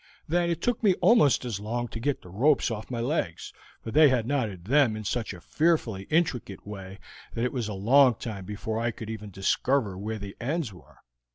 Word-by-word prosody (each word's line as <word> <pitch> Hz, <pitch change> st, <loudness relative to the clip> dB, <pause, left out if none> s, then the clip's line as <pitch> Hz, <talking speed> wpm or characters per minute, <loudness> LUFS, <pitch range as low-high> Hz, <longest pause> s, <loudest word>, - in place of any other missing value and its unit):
Then 175 Hz, +2 st, +1 dB
it 170 Hz, 0 st, -2 dB
took 245 Hz, -2 st, 0 dB
me 200 Hz, -5 st, +4 dB
almost 175 Hz, -, +4 dB
as 115 Hz, -5 st, -3 dB
long 120 Hz, +3 st, -3 dB
to 115 Hz, -, -6 dB
get 140 Hz, +4 st, -1 dB
the 90 Hz, -, -12 dB
ropes 125 Hz, -, +2 dB
off 110 Hz, -1 st, -5 dB
my 120 Hz, -2 st, -3 dB
legs, 120 Hz, -, -2 dB, 0.3 s
for 115 Hz, -, -5 dB
they 150 Hz, +4 st, +7 dB
had 125 Hz, -4 st, +1 dB
knotted 110 Hz, -10 st, -2 dB
them 130 Hz, -1 st, +3 dB
in 110 Hz, -, -6 dB
such 115 Hz, +3 st, -2 dB
a 90 Hz, -, -9 dB
fearfully 125 Hz, -, 0 dB
intricate 135 Hz, -, 0 dB
way 95 Hz, -2 st, -8 dB, 0.4 s
that 115 Hz, -, 0 dB
it 125 Hz, -, -2 dB
was 120 Hz, -5 st, -2 dB
a 105 Hz, -, -4 dB
long 125 Hz, +5 st, +5 dB
time 105 Hz, -5 st, -6 dB
before 105 Hz, +2 st, -4 dB
I 120 Hz, +1 st, 0 dB
could 110 Hz, -1 st, -7 dB
even 105 Hz, -2 st, -7 dB
discover 100 Hz, +3 st, 0 dB
where 110 Hz, +4 st, -4 dB
the 100 Hz, -1 st, -8 dB
ends 140 Hz, -, -2 dB
were. 80 Hz, -7 st, -17 dB
115 Hz, 210 wpm, -27 LUFS, 105-140 Hz, 0.4 s, they